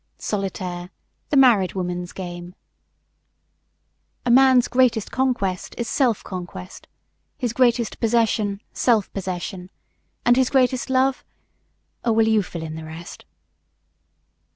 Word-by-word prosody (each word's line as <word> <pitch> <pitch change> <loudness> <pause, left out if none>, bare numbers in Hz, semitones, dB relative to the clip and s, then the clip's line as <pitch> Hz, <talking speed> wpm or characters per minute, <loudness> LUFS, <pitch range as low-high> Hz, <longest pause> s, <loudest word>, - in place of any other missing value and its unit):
Solitaire 185 -3 -4 0.4
the 290 - +2
married 230 -9 +5
woman's 180 -1 -3
game. 175 -1 -8 1.7
A 245 - +2
man's 260 -1 +6
greatest 245 -4 +2
conquest 240 -9 -1
is 235 - -3
self 245 -7 +1
conquest; 175 - -8 0.5
his 240 -2 -2
greatest 240 -3 +1
possession, 220 -3 +1
self 225 -5 +1
possession; 185 -1 -5 0.6
and 245 +1 +5
his 260 -1 +3
greatest 255 -1 +1
love 260 0 +2 0.8
Oh, 230 - +2
well, 220 0 +3
you 220 -1 +4
fill 170 -3 -7
in 160 -1 -6
the 160 0 -7
rest. 160 +2 -10
215 Hz, 115 wpm, -22 LUFS, 180-245 Hz, 1.7 s, man's